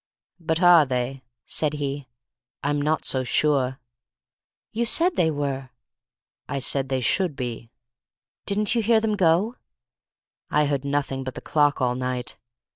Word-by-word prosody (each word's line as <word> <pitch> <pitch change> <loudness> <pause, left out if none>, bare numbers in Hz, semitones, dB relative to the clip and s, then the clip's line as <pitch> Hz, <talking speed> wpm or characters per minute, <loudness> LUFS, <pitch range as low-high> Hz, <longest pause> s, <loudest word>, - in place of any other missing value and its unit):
"But 160 +1 -1
are 175 -3 +8
they?" 130 0 -2 0.2
said 150 -1 -1
he. 145 -2 -4 0.6
"I'm 145 0 0
not 155 +1 0
so 130 -1 0
sure." 130 0 +1 0.9
"You 230 +2 -1
said 335 +9 +2
they 160 - +3
were!" 140 -3 -3 0.8
"I 140 - -2
said 135 0 -1
they 130 -1 0
should 165 - +1
be." 120 -3 -5 0.8
"Didn't 210 +1 +2
you 235 - +2
hear 225 +1 +4
them 220 -1 0
go?" 190 +6 +2 0.9
"I 150 0 +3
heard 140 -1 -1
nothing 140 -1 -1
but 130 -1 -6
the - - -5
clock 145 -2 +2
all 125 -1 +2
night. 125 -1 -3
145 Hz, 145 wpm, -24 LUFS, 130-170 Hz, 0.9 s, are